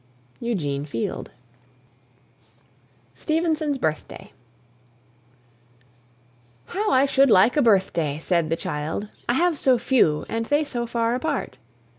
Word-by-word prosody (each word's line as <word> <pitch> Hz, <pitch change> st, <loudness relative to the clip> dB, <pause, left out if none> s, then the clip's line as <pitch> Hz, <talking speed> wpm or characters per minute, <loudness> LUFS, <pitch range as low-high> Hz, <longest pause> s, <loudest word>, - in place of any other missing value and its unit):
EUGENE 150 Hz, -13 st, -2 dB
FIELD. 130 Hz, -6 st, -4 dB, 1.8 s
STEVENSON'S 315 Hz, -3 st, -1 dB
BIRTHDAY. 155 Hz, -, -4 dB, 2.3 s
"How 420 Hz, -, -2 dB
I 265 Hz, +1 st, +4 dB
should 275 Hz, 0 st, +3 dB
like 205 Hz, +3 st, +5 dB
a 295 Hz, -, +3 dB
birthday!" 185 Hz, -, +2 dB
said 170 Hz, -1 st, 0 dB
the 165 Hz, -, +1 dB
child, 160 Hz, +7 st, -4 dB, 0.2 s
"I -, -, +4 dB
have 330 Hz, +2 st, +1 dB
so 260 Hz, -2 st, +4 dB
few, 230 Hz, -, +2 dB
and 225 Hz, 0 st, -3 dB
they 290 Hz, +1 st, +2 dB
so 240 Hz, -5 st, -4 dB
far 230 Hz, 0 st, 0 dB
apart." 285 Hz, +2 st, -3 dB
235 Hz, 110 wpm, -23 LUFS, -, 2.3 s, like